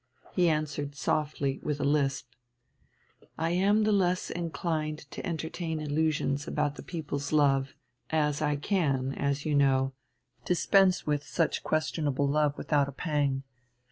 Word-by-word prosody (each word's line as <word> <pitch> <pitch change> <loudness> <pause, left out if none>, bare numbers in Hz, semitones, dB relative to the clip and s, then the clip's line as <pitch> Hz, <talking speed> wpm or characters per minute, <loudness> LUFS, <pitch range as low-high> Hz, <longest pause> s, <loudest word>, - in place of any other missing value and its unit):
He 175 -2 +3
answered 150 -2 -2
softly 145 -2 -1
with 150 -1 -2
a - - -1
lisp: 140 -3 +1 1.1
"I 165 +1 0
am 200 +4 +3
the 215 - +2
less 185 -3 +1
inclined 160 -2 -2
to - - -6
entertain 160 -2 -3
illusions 150 -1 0
about 150 -2 0
the - - -9
people's 145 -4 -4
love, 140 -3 +2 0.3
as 150 -2 +1
I 150 -1 +1
can, 140 -5 0
as 140 +1 -1
you 155 - 0
know, 135 -2 +3 0.5
dispense 185 +1 +3
with 145 -1 0
such 165 +1 0
questionable 150 -3 0
love 150 0 +1
without 145 -2 +1
a - - -6
pang. 140 -2 -1
150 Hz, 140 wpm, -29 LUFS, 140-165 Hz, 1.1 s, He